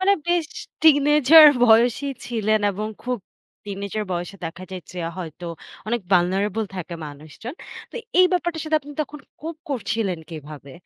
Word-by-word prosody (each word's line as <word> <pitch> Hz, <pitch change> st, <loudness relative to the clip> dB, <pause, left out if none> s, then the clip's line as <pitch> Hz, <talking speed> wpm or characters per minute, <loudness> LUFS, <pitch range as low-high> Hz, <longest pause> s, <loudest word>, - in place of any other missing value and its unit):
মানে 390 Hz, +1 st, +4 dB, 0.2 s
বেশ 345 Hz, -3 st, +2 dB, 0.4 s
teenager 300 Hz, 0 st, +7 dB, 0.2 s
বয়সেই 245 Hz, +5 st, +4 dB
ছিলেন, 215 Hz, -2 st, +1 dB
এবং 210 Hz, +2 st, -4 dB
খুব 250 Hz, -1 st, -2 dB, 0.5 s
teenager 200 Hz, +1 st, -4 dB
বয়সে 175 Hz, +3 st, -4 dB
দেখা 165 Hz, +3 st, -6 dB
যায় 185 Hz, -1 st, -6 dB
যে 180 Hz, -, -7 dB, 0.2 s
হয়তো 175 Hz, 0 st, -7 dB, 0.4 s
অনেক 235 Hz, +2 st, 0 dB
vulnerable 195 Hz, +4 st, +2 dB
থাকে 180 Hz, -1 st, -5 dB
মানুষজন। 155 Hz, -, -9 dB, 0.4 s
তো -, -, -18 dB, 0.2 s
এই 365 Hz, -, +8 dB
ব্যাপারটার 345 Hz, -3 st, -1 dB
সাথে 310 Hz, 0 st, +2 dB
আপনি 290 Hz, +1 st, -11 dB
তখন 295 Hz, +1 st, -10 dB, 0.2 s
cope 320 Hz, 0 st, -7 dB
করছিলেন 220 Hz, -, -1 dB
কিভাবে? 150 Hz, -3 st, -9 dB
220 Hz, 145 wpm, -23 LUFS, 180-290 Hz, 0.5 s, এই